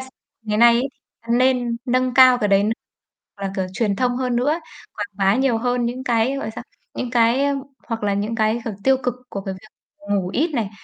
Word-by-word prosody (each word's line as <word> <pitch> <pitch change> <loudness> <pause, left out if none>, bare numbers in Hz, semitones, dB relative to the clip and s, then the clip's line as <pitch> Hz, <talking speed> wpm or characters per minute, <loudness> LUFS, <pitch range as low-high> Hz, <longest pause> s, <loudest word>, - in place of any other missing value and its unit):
s - - -14 0.3
ngày 210 -1 -2
nay 235 0 +7
ấy 250 +3 0 0.5
nên 250 -2 +2
nâng 255 0 +1
cao 255 -1 +7
cái 210 -4 0
đấy 195 0 +4
n 215 - +1 0.7
hoặc 200 - -12
là 190 - -5
kiểu 190 - -1
truyền 200 0 0
thông 245 +1 0
hơn 250 -1 -1
nữa, 290 +7 +1 0.4
quảng 205 -1 -3
bá 195 +1 +2
nhiều 260 -3 +2
hơn 245 +1 0
những 250 +2 -4
cái, 240 +1 +1
gọi 275 - -4
là - - -3
sao, - - -7 0.3
những 250 - -4
cái, 240 +2 +3
ơ 285 0 +1 0.3
hoặc 230 -2 -3
là 205 -1 +1
những 210 +3 -2
cái, 220 +1 +1
kiểu, 225 -4 -4
tiêu 265 0 +5
cực 250 -1 -1
của 200 - -5
cái 195 -1 -5
việc 190 +3 -15 0.4
ngủ 195 -3 +1
ít 305 - 0
này, 220 -6 -1
235 Hz, 235 wpm, -21 LUFS, 210-255 Hz, 0.7 s, nay